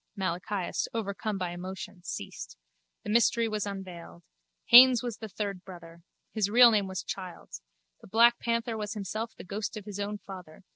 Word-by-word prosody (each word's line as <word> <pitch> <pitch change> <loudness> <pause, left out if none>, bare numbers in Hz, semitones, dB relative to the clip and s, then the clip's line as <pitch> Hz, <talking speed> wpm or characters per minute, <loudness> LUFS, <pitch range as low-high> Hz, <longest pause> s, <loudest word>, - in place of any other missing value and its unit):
Malachias, 185 +1 -2
overcome 210 -1 -3
by 180 -2 -3
emotion, 185 +2 -7
ceased. - - -7 0.5
The 210 - -4
mystery 235 0 +3
was 215 -2 -2
unveiled. 180 - -8 0.4
Haines 250 0 +8
was 240 -2 -4
the 220 -1 -8
third 200 -2 -4
brother. 170 -2 -12 0.3
His 210 -3 0
real 240 +2 +8
name 205 -3 +1
was 190 -3 -5
Childs. 185 - -7 0.4
The - - -14
black 235 +4 +5
panther 235 0 -1
was 210 0 -4
himself 215 +3 -4
the - - -10
ghost 205 +3 -5
of 205 - -8
his 205 -1 -7
own 205 +1 -3
father. 185 -5 -11
205 Hz, 165 wpm, -29 LUFS, 185-225 Hz, 0.5 s, Haines